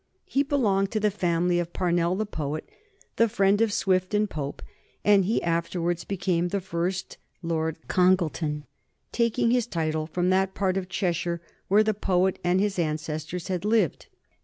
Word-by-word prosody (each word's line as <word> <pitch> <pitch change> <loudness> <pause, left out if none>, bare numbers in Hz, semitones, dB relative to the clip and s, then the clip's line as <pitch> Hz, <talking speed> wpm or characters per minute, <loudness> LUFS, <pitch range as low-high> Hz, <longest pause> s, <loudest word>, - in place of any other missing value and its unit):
He 275 - +1
belonged 210 -9 +1
to 215 - +1
the 210 0 +2
family 175 -2 +1
of 175 0 -4
Parnell 175 -1 +1
the 215 +3 -1
poet, 155 -5 -4 0.5
the 230 0 +4
friend 200 +1 +3
of 225 -2 +3
Swift 185 0 +1
and 210 0 +2
Pope, 145 -6 -5 0.4
and 200 -2 +5
he 220 +5 0
afterwards 170 +1 -1
became 180 -3 0
the 200 +3 -1
first 180 +1 -3 0.2
Lord 160 -1 -1
Congleton, 170 -5 +1 0.5
taking 230 0 +1
his 245 -2 +2
title 155 -5 -1
from 180 +2 0
that 190 0 +1
part 190 -2 0
of 190 -1 -3
Cheshire 175 -2 -1 0.3
where 205 +3 +5
the 215 0 +1
poet 190 -2 +1
and 175 +1 +2
his 200 -2 0
ancestors 155 +1 -3
had 185 -1 -2
lived. 210 -6 +1
185 Hz, 160 wpm, -26 LUFS, 170-200 Hz, 0.5 s, and